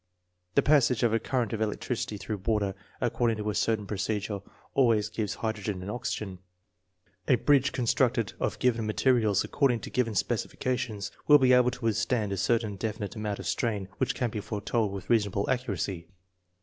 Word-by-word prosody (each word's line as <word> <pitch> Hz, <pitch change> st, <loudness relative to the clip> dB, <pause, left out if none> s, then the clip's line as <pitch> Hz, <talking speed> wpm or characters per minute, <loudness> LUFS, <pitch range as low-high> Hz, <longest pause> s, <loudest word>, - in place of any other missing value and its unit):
The -, -, +5 dB
passage 135 Hz, -5 st, +4 dB
of 115 Hz, -2 st, +3 dB
a 115 Hz, -, +3 dB
current 120 Hz, -2 st, -1 dB
of 110 Hz, -, -2 dB
electricity 110 Hz, +1 st, -2 dB
through 105 Hz, +1 st, -4 dB
water 100 Hz, 0 st, 0 dB, 0.3 s
according 115 Hz, -2 st, +1 dB
to 105 Hz, 0 st, -2 dB
a -, -, -4 dB
certain 105 Hz, 0 st, 0 dB
procedure 100 Hz, 0 st, -2 dB, 0.3 s
always 115 Hz, -5 st, +3 dB
gives 110 Hz, -1 st, -3 dB
hydro 110 Hz, -2 st, -3 dB
gen 95 Hz, -2 st, -3 dB
and 100 Hz, -, -4 dB
oxygen. 105 Hz, -6 st, -4 dB, 0.9 s
A 130 Hz, -, +6 dB
bridge 140 Hz, +2 st, +3 dB
constructed 120 Hz, -2 st, +1 dB
of -, -, -1 dB
given 115 Hz, -3 st, +1 dB
mate 110 Hz, -, -3 dB
rials 115 Hz, -6 st, +4 dB
according 125 Hz, -5 st, +1 dB
to -, -, -8 dB
given 115 Hz, -4 st, 0 dB
specifications 120 Hz, -1 st, -2 dB, 0.2 s
will 150 Hz, -, +9 dB
be 130 Hz, -2 st, +4 dB
able 125 Hz, 0 st, +5 dB
to 125 Hz, -1 st, -7 dB
withstand 110 Hz, -1 st, +1 dB
a 100 Hz, -, -2 dB
certain 110 Hz, 0 st, 0 dB
definite 105 Hz, 0 st, -4 dB
amount 105 Hz, -2 st, -3 dB
of -, -, -8 dB
strain 105 Hz, -5 st, -1 dB
which 125 Hz, -1 st, 0 dB
can 120 Hz, -2 st, -1 dB
be 105 Hz, -, -3 dB
foretold 105 Hz, +1 st, -1 dB
with 100 Hz, -1 st, -7 dB
reasonable 105 Hz, -3 st, +1 dB
accuracy. 100 Hz, -8 st, -2 dB
110 Hz, 175 wpm, -28 LUFS, 105-125 Hz, 0.9 s, will